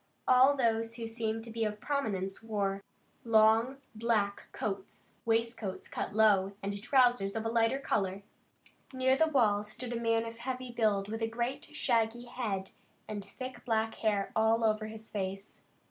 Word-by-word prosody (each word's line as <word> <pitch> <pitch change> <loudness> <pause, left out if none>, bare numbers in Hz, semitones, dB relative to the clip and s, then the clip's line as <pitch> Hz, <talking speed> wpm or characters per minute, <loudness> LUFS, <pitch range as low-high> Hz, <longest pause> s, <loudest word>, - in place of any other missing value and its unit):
All 260 +3 +6
those 230 -2 +1
who 230 -1 -5
seemed 225 -1 -2
to 230 - -9
be 225 0 -1
of 210 -1 -2
prominence 200 -10 -2
wore 200 -3 -1 0.4
long 225 +3 +4 0.2
black 215 -3 0
coats, 195 -2 -5
waistcoats 225 -3 -1
cut - - -4
low, 200 -3 +4
and 200 0 -3
trousers 245 -5 +3
of 225 0 -2
a - - +1
lighter 230 +2 +2
color. 195 -7 -1 0.7
Near 260 0 +2
the 320 +4 +3
wall 225 -9 +3
stood 235 +3 -5
a 235 - -3
man 230 0 +2
of 230 0 -8
heavy 255 0 -4
build 215 -4 +1
with 225 +2 -4
a 225 - +1
great 235 +3 -3
shaggy 240 -5 0
head 210 -6 -3 0.4
and 205 -2 -4
thick 255 +6 -8
black 225 -2 0
hair 205 -3 0
all 225 +1 +3
over 215 -1 +1
his 220 0 -8
face. 195 0 -5
225 Hz, 160 wpm, -31 LUFS, 205-235 Hz, 0.7 s, All